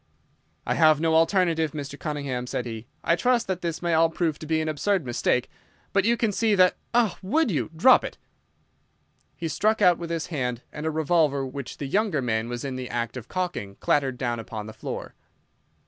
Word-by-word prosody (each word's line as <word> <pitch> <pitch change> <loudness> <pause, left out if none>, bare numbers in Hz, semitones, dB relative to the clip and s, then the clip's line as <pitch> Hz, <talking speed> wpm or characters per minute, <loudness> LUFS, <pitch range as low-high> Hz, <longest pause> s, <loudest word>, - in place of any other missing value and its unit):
"I - - +1
have 155 -2 +5
no 160 0 +1
alternative, 165 -2 +2
Mr. 145 -1 -6
Cunningham," 140 -5 -3
said 125 - -3
he. 115 0 -7 0.2
"I 170 - +3
trust 240 +5 +2
that 185 -2 -3
this 170 0 -3
may 170 -1 +1
all 165 +1 +4
prove 160 -2 -1
to 155 - -8
be 160 0 +1
an 155 - -2
absurd 165 +3 0
mistake, 125 +1 0 0.5
but 200 -1 +3
you 235 +1 +3
can 225 -3 +1
see 215 +1 +2
that—Ah, 200 +4 +2
would 235 +7 +1
you? 155 - -1
Drop 255 +11 +6
it!" - - -6 1.2
He 165 - -4
struck 215 +7 +1
out 180 -4 +5
with 170 -1 -5
his 165 -1 -2
hand, 125 -4 -2
and 150 +1 -4
a - - +2
revolver 155 -3 +1
which 130 0 -7
the 145 - -4
younger 195 +1 +1
man 115 -2 -1
was 120 +2 -4
in 130 -2 -4
the 130 -1 -5
act 120 0 -3
of 125 -2 -7
cocking 175 - -3
clattered 135 0 +1
down 120 -2 -2
upon 110 -1 -6
the 110 - -9
floor. - - -6
155 Hz, 200 wpm, -25 LUFS, 130-180 Hz, 1.2 s, Drop